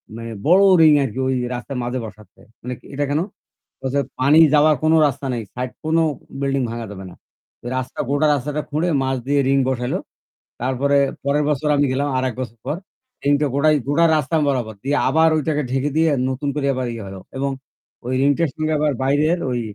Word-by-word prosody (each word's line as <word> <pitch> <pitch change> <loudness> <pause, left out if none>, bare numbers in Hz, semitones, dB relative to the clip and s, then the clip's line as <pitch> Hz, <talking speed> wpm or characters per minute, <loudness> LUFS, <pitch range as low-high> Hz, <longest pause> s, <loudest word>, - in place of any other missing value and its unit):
মানে 115 0 -7 0.2
বড় 180 +4 +6 0.2
ring 155 -2 +7
আরকি 130 -1 -4
ওই 130 - +1 0.2
রাস্তার 125 +2 -6
মাঝে 125 +1 -3
বসাচ্ছে। 105 -1 -14 0.2
মানে 125 +1 -5 0.2
এটা 145 +1 -1
কেন? 145 +2 +1 0.6
বলে 130 - -3
যে, 140 - +3 0.2
"পানি 140 +4 +5 0.2
যাওয়ার 150 +1 +5
কোনো 160 +1 +4
রাস্তা 140 0 -3
নাই। 120 -2 -3
সাইড 125 0 -3
কোনো 160 +1 +2 0.4
বিল্ডিং 135 -1 0
ভাঙ্গা 115 0 -5
যাবে 95 -1 -9
না।" - - -13 0.6
রাস্তা 130 0 -4
গোটা 145 +2 +2
রাস্তাটা 145 +2 -2
খুঁড়ে 155 +4 0
মাঝ 130 0 0
দিয়ে 140 +1 +2
ring 135 0 +3
বসাইলো। 125 -1 -1 0.6
তারপরে 130 +3 +1 0.3
পরের 145 +1 +1
বছর 150 +1 0
আমি 145 0 +3
গেলাম। 140 +2 0
আরেক 130 -2 -1
বছর 120 -2 -6
পর। 145 +3 -1 0.5
Ring 145 0 +4
টা 150 - +2
গোটাই 150 +2 +4
গোটা 155 +4 +3
রাস্তা 155 +2 0
বরাবর 125 -6 -1
দিয়ে 145 +2 +1
আবার 160 +4 +4
ওইটাকে 150 -1 0
ঢেকে 135 +3 0
দিয়ে 160 0 +3 0.2
নতুন 130 +2 -3
করে 145 -2 -1
আবার 130 0 -2
ইয়ে 115 -1 -6
হলো 95 0 -8 0.2
এবং 140 +1 -1 0.6
ওই 130 - -1
ring 140 +1 +4
টার 165 -3 +1
সঙ্গে 155 0 -1
আবার 150 0 +1
বাইরের 150 +6 +2
ওই 120 -1 -1
140 Hz, 195 wpm, -20 LUFS, 130-150 Hz, 0.6 s, ring